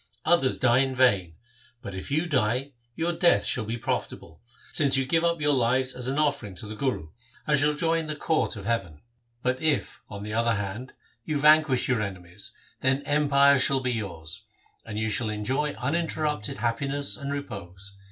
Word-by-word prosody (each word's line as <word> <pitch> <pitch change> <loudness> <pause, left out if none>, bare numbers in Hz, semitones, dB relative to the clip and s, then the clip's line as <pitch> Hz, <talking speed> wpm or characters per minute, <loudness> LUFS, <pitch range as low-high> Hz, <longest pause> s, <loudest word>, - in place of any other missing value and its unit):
Others 160 -6 +3
die 125 0 +3
in 135 -1 0
vain, 100 -10 +2 0.5
but 100 -4 -6
if 95 +6 -7
you 155 +4 +1
die, 130 -2 0 0.2
your 170 +1 -1
death 170 +1 +3
shall 115 - 0
be 115 +2 -3
profitable, 85 -7 -4 0.3
since 140 -3 +3
you 135 - +1
give 165 +5 +1
up 170 -1 +1
your 145 0 +2
lives 130 +1 +1
as 125 0 -4
an 135 +2 -1
offering 140 -10 0
to 100 - -8
the 105 - -7
Guru, 105 - -2 0.4
and 150 -2 +2
shall 150 +1 +2
join 165 0 0
the 155 - -3
court 155 -2 0
of 100 -2 -8
no 115 - 0
THE 115 - +4
SIKH - - -13
RELIGION - - -14
heaven; 75 - -21 0.4
but 125 +1 0
if, 155 -3 0
on 100 -1 -7
the 105 0 -5
other 115 0 +2
hand, 105 +5 -5 0.3
you 155 +2 -2
vanquish 150 -3 +4
your 125 -4 +1
enemies, 95 -1 -7 0.3
then 135 +2 +1
empire 140 -1 +4
shall 135 0 +4
be 130 -1 -1
yours, 85 -9 -5 0.4
and 105 -2 -6
you 110 0 -1
shall 115 -1 +1
enjoy 130 +8 -1
uninterrupted 150 -3 -2
happiness 135 0 0
and 140 +4 -5
repose. 100 -7 -7
130 Hz, 195 wpm, -26 LUFS, 105-145 Hz, 0.5 s, THE